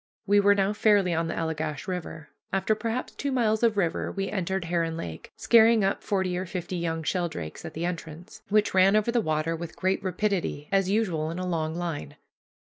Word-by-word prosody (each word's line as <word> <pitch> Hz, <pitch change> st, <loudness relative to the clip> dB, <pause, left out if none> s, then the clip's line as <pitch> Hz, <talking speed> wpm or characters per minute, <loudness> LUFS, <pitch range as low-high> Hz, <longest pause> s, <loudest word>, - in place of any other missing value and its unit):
We 205 Hz, +1 st, +4 dB
were 205 Hz, 0 st, +5 dB
now 195 Hz, +1 st, +1 dB
fairly 205 Hz, -4 st, +3 dB
on 165 Hz, 0 st, 0 dB
the 165 Hz, -, -3 dB
Allegash 160 Hz, -1 st, -3 dB
River. 165 Hz, -4 st, -5 dB, 0.2 s
After 195 Hz, +3 st, +1 dB
perhaps 230 Hz, +3 st, -3 dB
two 280 Hz, -, -3 dB
miles 220 Hz, -4 st, +1 dB
of 230 Hz, -3 st, +3 dB
river 170 Hz, -4 st, 0 dB
we 195 Hz, 0 st, -3 dB
entered 190 Hz, -2 st, -2 dB
Heron 165 Hz, -1 st, -1 dB
Lake, 80 Hz, -, -7 dB
scaring 230 Hz, -2 st, +5 dB
up 195 Hz, +1 st, 0 dB
forty 190 Hz, -3 st, -1 dB
or 185 Hz, +1 st, -3 dB
fifty 180 Hz, 0 st, -4 dB
young 165 Hz, -1 st, -2 dB
sheldrakes, 160 Hz, -, -3 dB
at -, -, -8 dB
the 165 Hz, +2 st, -2 dB
entrance, 170 Hz, -1 st, -6 dB
which 210 Hz, 0 st, +2 dB
ran 190 Hz, +2 st, +5 dB
over 215 Hz, +2 st, +2 dB
the 235 Hz, -1 st, +2 dB
water 155 Hz, -1 st, 0 dB
with 165 Hz, 0 st, -7 dB
great 190 Hz, +1 st, 0 dB
rapidity, 185 Hz, -5 st, -1 dB
as 195 Hz, -1 st, +2 dB
usual 180 Hz, -7 st, 0 dB
in 165 Hz, -, -5 dB
a 185 Hz, -, -3 dB
long 160 Hz, -3 st, -1 dB
line. 165 Hz, -4 st, -4 dB
185 Hz, 200 wpm, -27 LUFS, 165-205 Hz, 0.2 s, were